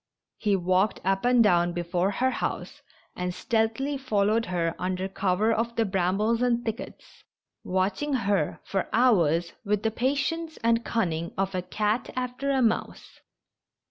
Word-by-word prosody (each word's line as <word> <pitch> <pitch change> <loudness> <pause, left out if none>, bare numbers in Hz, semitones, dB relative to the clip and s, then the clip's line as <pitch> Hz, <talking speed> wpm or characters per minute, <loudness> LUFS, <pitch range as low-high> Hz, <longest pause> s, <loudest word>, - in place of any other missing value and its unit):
He 210 -3 +2
walked 185 +3 +1
up 195 +3 +1
and 245 -1 +5
down 175 -4 +3
before 175 +2 0
her 255 +6 +1
house, - - -4 0.3
and 180 0 -3
stealthily 235 +6 0
fol 215 -7 +1
lowed 225 +2 +1
her 170 -2 -1
under 185 +1 -2
cover 195 +3 +1
of 235 +1 -1
the 225 - +2
brambles 195 +4 +1
and 240 -1 +1
thickets, 225 +2 -7 0.4
watching 195 +11 -1
her 200 -7 0
for 195 -1 -2
hours 175 -9 +3
with 210 -1 0
the 220 - +1
patience 285 +7 -1
and 230 0 +4
the - - -8
cun 225 -6 0
ning 165 +1 -4
of 195 0 -1
a 185 - -1
cat 210 +5 -1
after 255 +2 -3
a 265 -2 +2
mouse. 225 -1 -2
210 Hz, 160 wpm, -26 LUFS, 185-235 Hz, 0.4 s, and